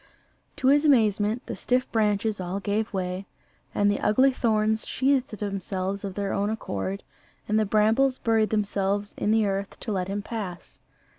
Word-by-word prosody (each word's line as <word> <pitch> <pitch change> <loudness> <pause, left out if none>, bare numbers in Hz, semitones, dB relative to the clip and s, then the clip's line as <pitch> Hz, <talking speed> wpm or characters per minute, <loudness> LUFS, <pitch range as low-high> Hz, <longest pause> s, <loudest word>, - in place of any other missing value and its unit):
To 265 -3 +2
his 290 +2 +5
amazement 220 -4 +3
the - - -5
stiff 250 +1 0
branches 210 -1 +1
all 180 +2 -3
gave 210 +2 -1
way, 185 0 -3 0.5
and 205 0 +3
the 205 - -1
ugly 260 +6 +4
thorns 220 -2 +1
sheathed 265 -4 +1
themselves 195 -1 -3
of 195 -2 -5
their 200 -1 -2
own 200 +1 0
accord, 100 - -4 0.4
and 215 +1 +2
the 215 - +2
brambles 220 +6 +3
buried 225 -3 +2
themselves 205 -1 -1
in - - -1
the 220 0 +3
earth 195 0 -3
to 220 - -4
let 185 -3 -1
him 200 +1 -3
pass. 200 -6 -7
210 Hz, 165 wpm, -26 LUFS, 195-225 Hz, 0.5 s, his